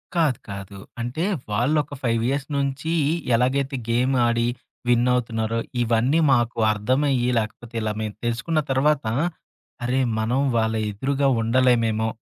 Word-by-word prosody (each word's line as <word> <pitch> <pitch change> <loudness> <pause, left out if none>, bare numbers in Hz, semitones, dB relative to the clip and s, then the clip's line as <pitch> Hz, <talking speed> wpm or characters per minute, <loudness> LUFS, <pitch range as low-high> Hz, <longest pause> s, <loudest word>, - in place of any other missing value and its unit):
కాదు, 155 -8 +2
కాదు. 100 0 -7 0.2
అంటే 120 +8 -3 0.3
వాళ్ళొక 145 +7 +1
5 115 -1 +1
ఇయర్స్ 140 0 -1
నుంచి, 140 +3 -2 0.4
ఎలాగైతే 135 +3 +1
గేమాడి 120 -1 +2 0.4
విన్ 120 0 +3
అవుతున్నారో, 115 -2 -1 0.2
ఇవన్నీ 120 +7 +2
మాకు 120 -2 +1
అర్థమయ్యి, 125 +4 +1
లాకపోతే 115 +2 -6
ఇలా 110 -1 -1
మేం 110 -1 -3
తెలుసుకున్న 120 +8 0
తర్వాత, 145 +1 +2 0.8
అరే! 130 +2 +1 0.2
మనం 115 +4 0 0.2
వాళ్ళ 110 0 +1 0.2
ఎదురుగా 135 +6 0
ఉండలేమేమో 115 -2 +2
120 Hz, 120 wpm, -23 LUFS, 115-135 Hz, 0.8 s, విన్